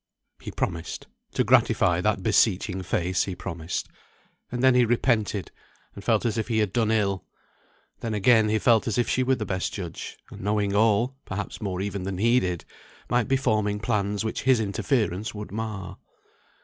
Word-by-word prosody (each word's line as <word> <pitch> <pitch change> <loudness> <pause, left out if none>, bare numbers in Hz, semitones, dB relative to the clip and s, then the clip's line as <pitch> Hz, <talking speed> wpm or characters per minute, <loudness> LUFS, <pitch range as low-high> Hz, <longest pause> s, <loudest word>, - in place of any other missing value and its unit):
He - - -6
promised; 80 0 -4 0.3
to - - +3
gratify - - +3
that - - 0
beseeching 95 0 +2
face 90 -1 0
he 95 - -4
promised. 85 0 -4 0.6
And 125 0 -2
then 130 -1 +6
he 125 0 +5
repented, 110 -5 +1 0.4
and 100 - -10
felt 110 0 +2
as 115 -1 0
if 110 - -2
he 115 -2 0
had 105 -3 +1
done 115 -3 +2
ill. 100 -4 0 0.7
Then 115 -2 -3
again 110 +1 +4
he 110 - +2
felt 115 0 +3
as 110 - -1
if 120 -2 +2
she 130 - +1
were 130 +1 +2
the 110 - -4
best 95 -1 -2
judge, 90 -5 -6
and - - -9
knowing 100 0 0
all 115 +5 +2
(perhaps 100 +4 -5
more 95 -4 -2
than 95 - -2
even 95 -2 -4
he 115 +5 +4
did) 90 -5 -3 0.5
might 120 -2 +2
be 135 - +3
forming 110 -6 0
plans 105 -2 -1
which 110 - -2
his 130 -2 +4
interference 105 -1 -1
would 105 0 -7
mar. 105 -3 -5
105 Hz, 180 wpm, -26 LUFS, 95-115 Hz, 0.7 s, then